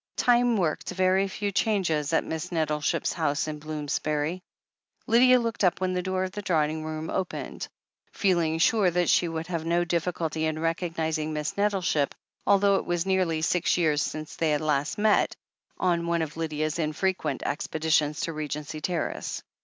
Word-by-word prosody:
Time 245 Hz, -1 st, +3 dB
worked 165 Hz, -5 st, -1 dB
very 185 Hz, +1 st, +2 dB
few 200 Hz, +1 st, -3 dB
changes 180 Hz, -8 st, +1 dB
at 165 Hz, -, +2 dB
Miss 160 Hz, +3 st, -5 dB
Nettleship's 155 Hz, -3 st, 0 dB
house 145 Hz, +2 st, 0 dB
in 150 Hz, -1 st, -5 dB
Bloomsbury. 150 Hz, +2 st, -2 dB, 0.6 s
Lydia 250 Hz, +2 st, +6 dB
looked 230 Hz, -3 st, -2 dB
up 180 Hz, -2 st, +3 dB
when 185 Hz, 0 st, 0 dB
the 180 Hz, -, 0 dB
door 185 Hz, 0 st, -1 dB
of 185 Hz, -, -3 dB
the 205 Hz, -, -5 dB
drawing 155 Hz, -4 st, 0 dB
room 155 Hz, 0 st, -4 dB
opened, 185 Hz, -2 st, -4 dB, 0.4 s
feeling 170 Hz, -5 st, +1 dB
sure 195 Hz, +3 st, +4 dB
that 175 Hz, 0 st, +2 dB
she 175 Hz, -, +3 dB
would 165 Hz, 0 st, -4 dB
have 170 Hz, -2 st, -3 dB
no 170 Hz, +1 st, +1 dB
difficulty 165 Hz, -2 st, -1 dB
in 155 Hz, 0 st, -2 dB
recognizing 160 Hz, -1 st, -1 dB
Miss 150 Hz, 0 st, -3 dB
Nettleship, 195 Hz, -8 st, +1 dB, 0.3 s
although 200 Hz, 0 st, +5 dB
it -, -, -3 dB
was 175 Hz, 0 st, -1 dB
nearly 185 Hz, -5 st, +1 dB
six 180 Hz, +1 st, +2 dB
years 155 Hz, -4 st, +2 dB
since 155 Hz, 0 st, -4 dB
they 165 Hz, -, 0 dB
had 150 Hz, 0 st, +1 dB
last 150 Hz, +3 st, 0 dB
met, 210 Hz, 0 st, +3 dB, 0.4 s
on 170 Hz, -2 st, +1 dB
one 170 Hz, -1 st, +1 dB
of 155 Hz, -1 st, -6 dB
Lydia's 155 Hz, 0 st, -2 dB
infrequent 155 Hz, -1 st, -1 dB
expeditions 155 Hz, 0 st, 0 dB
to 165 Hz, -, -2 dB
Regency 150 Hz, 0 st, -5 dB
Terrace. 175 Hz, 0 st, -3 dB
165 Hz, 165 wpm, -27 LUFS, 155-185 Hz, 0.6 s, Lydia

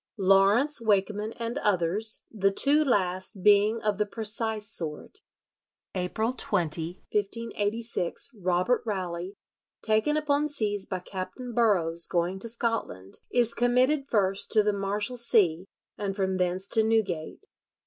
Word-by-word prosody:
Lawrence 200 Hz, +9 st, +4 dB
Wakeman 210 Hz, 0 st, 0 dB
and 235 Hz, +3 st, -4 dB
others,... 205 Hz, +3 st, -1 dB
the 195 Hz, -3 st, +1 dB
two 285 Hz, +9 st, +3 dB
last 190 Hz, -5 st, -1 dB
being 210 Hz, +2 st, +4 dB
of 210 Hz, -1 st, 0 dB
the 210 Hz, -, +2 dB
precise 220 Hz, 0 st, -1 dB
sort." 155 Hz, -6 st, -2 dB, 0.7 s
April 220 Hz, +6 st, -2 dB
20, 170 Hz, -6 st, -1 dB
1586, 210 Hz, 0 st, -2 dB
Robert 180 Hz, +7 st, +1 dB
Rowley, 185 Hz, -3 st, -4 dB, 0.5 s
taken 220 Hz, +8 st, +2 dB
upon 300 Hz, 0 st, 0 dB
seas 205 Hz, -7 st, -2 dB
by 185 Hz, -, -3 dB
Captain 190 Hz, +7 st, -7 dB
Burrows 175 Hz, -8 st, +3 dB
going 175 Hz, +2 st, -1 dB
to 230 Hz, -, -1 dB
Scotland, 225 Hz, -, -3 dB
is 240 Hz, -2 st, +2 dB
committed 255 Hz, +4 st, +2 dB
first 195 Hz, -5 st, 0 dB
to 215 Hz, -2 st, +5 dB
the 210 Hz, 0 st, +1 dB
Marshalsea, 205 Hz, -3 st, 0 dB, 0.3 s
and 195 Hz, -2 st, -3 dB
from 190 Hz, -1 st, -1 dB
thence 185 Hz, +1 st, -1 dB
to 225 Hz, -, +5 dB
Newgate. 220 Hz, -, -1 dB
205 Hz, 125 wpm, -27 LUFS, 185-230 Hz, 0.7 s, to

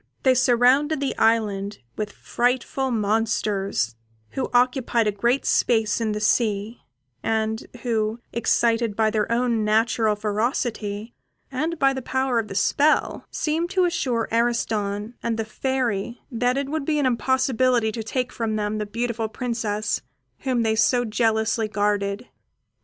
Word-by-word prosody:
They 260 Hz, -, +5 dB
surrounded 255 Hz, +4 st, +3 dB
the 280 Hz, -1 st, -1 dB
island 210 Hz, -3 st, +1 dB, 0.2 s
with 210 Hz, -1 st, -3 dB
frightful 250 Hz, +4 st, -1 dB
monsters, 210 Hz, -, 0 dB, 0.4 s
who 265 Hz, -, -3 dB
occupied 245 Hz, -2 st, +2 dB
a 210 Hz, -, +2 dB
great 235 Hz, +6 st, 0 dB
space 220 Hz, -2 st, +2 dB
on 220 Hz, -2 st, 0 dB
the 210 Hz, -, -2 dB
sea, 210 Hz, +1 st, 0 dB, 0.4 s
and 220 Hz, 0 st, -1 dB, 0.2 s
who, 220 Hz, -2 st, 0 dB, 0.2 s
excited 230 Hz, -1 st, +1 dB
by 220 Hz, 0 st, +2 dB
their 215 Hz, 0 st, 0 dB
own 235 Hz, -2 st, +1 dB
natural 220 Hz, 0 st, +2 dB
ferocity, 215 Hz, 0 st, -2 dB, 0.4 s
and 315 Hz, +6 st, -2 dB
by 275 Hz, -2 st, +3 dB
the 265 Hz, -, -4 dB
power 260 Hz, -1 st, 0 dB
of 220 Hz, -, -3 dB
the 195 Hz, -, -7 dB
spell, 295 Hz, +9 st, +2 dB
seemed 325 Hz, +3 st, -1 dB
to 375 Hz, -1 st, +2 dB
assure 250 Hz, -10 st, 0 dB
Ariston 220 Hz, -2 st, 0 dB
and 230 Hz, -1 st, -1 dB
the 225 Hz, -, -2 dB
Fairy 240 Hz, -2 st, -2 dB
that 245 Hz, +2 st, +1 dB
it 275 Hz, 0 st, -1 dB
would 310 Hz, 0 st, -2 dB
be 300 Hz, +1 st, 0 dB
an 290 Hz, -, +1 dB
impossibility 255 Hz, -2 st, +2 dB
to 225 Hz, -, -4 dB
take 250 Hz, +3 st, -2 dB
from 225 Hz, -3 st, -2 dB
them 210 Hz, 0 st, -1 dB
the 210 Hz, -, -3 dB
beautiful 230 Hz, +1 st, -2 dB
Princess 220 Hz, -3 st, -2 dB, 0.4 s
whom 255 Hz, -3 st, 0 dB
they 220 Hz, -1 st, +1 dB
so 245 Hz, +2 st, +3 dB
jealously 220 Hz, 0 st, +1 dB
guarded. 205 Hz, +1 st, -1 dB
230 Hz, 145 wpm, -24 LUFS, 215-250 Hz, 0.4 s, They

